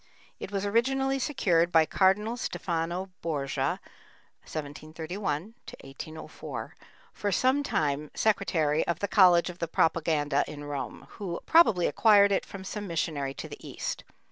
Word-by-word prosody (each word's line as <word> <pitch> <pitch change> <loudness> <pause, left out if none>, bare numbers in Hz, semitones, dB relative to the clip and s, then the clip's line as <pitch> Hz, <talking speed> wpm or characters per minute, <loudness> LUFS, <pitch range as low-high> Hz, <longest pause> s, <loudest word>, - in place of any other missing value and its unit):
It - - -7
was 200 0 -2
originally 270 +5 +1
secured 175 - +2
by 160 -2 +5
Cardinal 200 +7 +2
Stefano 175 -4 -3
Borgia 140 -5 -1 0.6
(1731 155 +5 -5 0.3
1804), 155 +4 -8 0.4
for 205 - -2
some 260 +8 +3
time 150 - -1
secretary 165 -8 +1
of 170 - 0
the 200 - -2
College 180 -3 +5
of 175 - -16
the 170 - -2
Propaganda 155 -3 +1
in 145 -1 -8
Rome, 145 -2 -5
who 180 -4 -4
probably 225 - +5
acquired 205 -3 +5
it 195 - 0
from 195 -1 -8
some 205 +1 -5
missionary 145 -5 -2
to - - -6
the - - -10
East. - - -4
175 Hz, 135 wpm, -28 LUFS, 155-205 Hz, 0.6 s, by